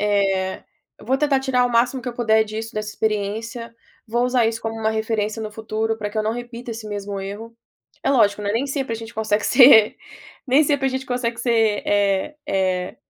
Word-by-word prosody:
eh, 195 Hz, -2 st, 0 dB, 0.4 s
vou 260 Hz, +5 st, 0 dB
tentar 285 Hz, -2 st, +2 dB
tirar 255 Hz, -2 st, +1 dB
o -, -, -3 dB
máximo 245 Hz, +2 st, +2 dB
que -, -, -4 dB
eu 240 Hz, -, -6 dB
puder 220 Hz, -2 st, +3 dB
disso, 220 Hz, +2 st, -6 dB
dessa 215 Hz, 0 st, -3 dB
experiência. 220 Hz, +2 st, -3 dB, 0.3 s
Vou 240 Hz, +2 st, 0 dB
usar 250 Hz, -2 st, +2 dB
isso 225 Hz, 0 st, -3 dB
como 225 Hz, 0 st, -3 dB
uma 220 Hz, -, +1 dB
referência 220 Hz, 0 st, -2 dB
no 215 Hz, -, -5 dB
futuro, 220 Hz, 0 st, -2 dB
pra 210 Hz, -1 st, -3 dB
que 215 Hz, -, -10 dB
eu -, -, +1 dB
não 215 Hz, +1 st, -1 dB
repita 240 Hz, 0 st, -7 dB
esse 220 Hz, -1 st, -8 dB
mesmo 200 Hz, -1 st, -5 dB
erro". 210 Hz, +4 st, -8 dB, 0.5 s
É -, -, +1 dB
lógico, 210 Hz, -6 st, +3 dB
né, 205 Hz, -, -1 dB
nem 235 Hz, +6 st, 0 dB
sempre 270 Hz, -3 st, -3 dB
a -, -, -4 dB
gente 225 Hz, 0 st, -9 dB
consegue 215 Hz, -1 st, 0 dB
ser 245 Hz, -5 st, +7 dB, 0.5 s
nem 270 Hz, +4 st, +5 dB
sempre 285 Hz, -2 st, +1 dB
a -, -, +3 dB
gente 260 Hz, 0 st, -3 dB
consegue 240 Hz, -2 st, -2 dB
ser, 225 Hz, -3 st, +2 dB
eh 200 Hz, +7 st, +1 dB
eh 185 Hz, -1 st, -1 dB
225 Hz, 205 wpm, -21 LUFS, 210-245 Hz, 0.5 s, ser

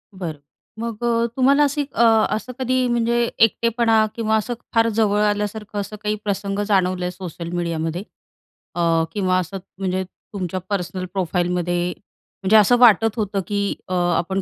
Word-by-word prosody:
बरं 165 Hz, -6 st, -5 dB, 0.4 s
मग 230 Hz, 0 st, -5 dB
अ, 235 Hz, 0 st, +2 dB
तुम्हाला 275 Hz, +3 st, +4 dB
अशी 290 Hz, +1 st, +1 dB
अ, -, -, +1 dB, 0.3 s
असं 250 Hz, +3 st, -6 dB
कधी 255 Hz, 0 st, +1 dB
म्हणजे 235 Hz, 0 st, +1 dB
एकटेपणा 225 Hz, 0 st, +3 dB
किंवा 220 Hz, -1 st, +1 dB
असं 240 Hz, +3 st, -2 dB, 0.2 s
फार 230 Hz, 0 st, +4 dB
जवळ 210 Hz, -1 st, +3 dB
आल्यासारखं 210 Hz, 0 st, -1 dB
असं 205 Hz, +2 st, -7 dB
काही 210 Hz, 0 st, 0 dB
प्रसंग 200 Hz, 0 st, -2 dB
जाणवले 185 Hz, -2 st, +1 dB
सोशल 175 Hz, -2 st, -7 dB
मीडियामध्ये 170 Hz, +1 st, -2 dB, 0.7 s
अ, 165 Hz, -1 st, +2 dB
किंवा 185 Hz, -3 st, +1 dB
असं 185 Hz, +2 st, -4 dB, 0.2 s
म्हणजे 190 Hz, -1 st, -1 dB
तुमच्या 185 Hz, -1 st, -6 dB
पर्सनल 185 Hz, -1 st, -2 dB
प्रोफाईलमध्ये 175 Hz, -1 st, 0 dB, 0.5 s
म्हणजे 200 Hz, +3 st, +3 dB
असं 245 Hz, +4 st, +5 dB
वाटत 225 Hz, -2 st, +5 dB
होतं 205 Hz, -2 st, -1 dB
की 200 Hz, -1 st, -1 dB
अ, 185 Hz, -, -4 dB, 0.2 s
आपण 190 Hz, +3 st, -1 dB
205 Hz, 145 wpm, -21 LUFS, 180-225 Hz, 0.7 s, असं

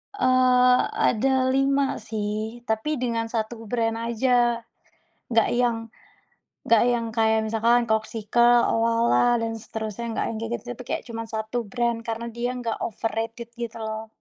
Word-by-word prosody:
Eee, 255 Hz, -4 st, +4 dB, 0.3 s
ada 255 Hz, +4 st, +2 dB, 0.2 s
5 275 Hz, +1 st, +2 dB, 0.2 s
sih 215 Hz, +2 st, -4 dB
tapi 220 Hz, +7 st, -1 dB
dengan 230 Hz, -2 st, -1 dB
1 225 Hz, 0 st, -4 dB
brand 225 Hz, -2 st, 0 dB
aja. 240 Hz, 0 st, +2 dB, 0.7 s
Nggak 225 Hz, -2 st, +3 dB
yang, 240 Hz, -2 st, +2 dB, 0.9 s
nggak 230 Hz, -2 st, +5 dB
yang 235 Hz, -1 st, 0 dB
kayak 220 Hz, 0 st, +3 dB
misalkan 230 Hz, +2 st, +3 dB
Corkcicle, 225 Hz, +2 st, +3 dB
Owala, 230 Hz, +1 st, +3 dB
dan 225 Hz, 0 st, -1 dB
seterusnya 220 Hz, 0 st, -6 dB
nggak -, -, -1 dB
yang 220 Hz, -, -4 dB
kayak 225 Hz, +1 st, -5 dB
gitu, 225 Hz, -, -9 dB
tapi 250 Hz, -, -8 dB
kayak -, -, -2 dB
cuman 230 Hz, 0 st, -5 dB
1 220 Hz, +2 st, -4 dB
brand 235 Hz, +1 st, -1 dB
karena 230 Hz, +1 st, -3 dB
dia 240 Hz, +2 st, -2 dB
nggak 230 Hz, -2 st, -3 dB
overrated 225 Hz, +1 st, -4 dB
gitu 235 Hz, -1 st, -5 dB
loh. 220 Hz, 0 st, -5 dB
230 Hz, 145 wpm, -24 LUFS, 220-240 Hz, 0.9 s, nggak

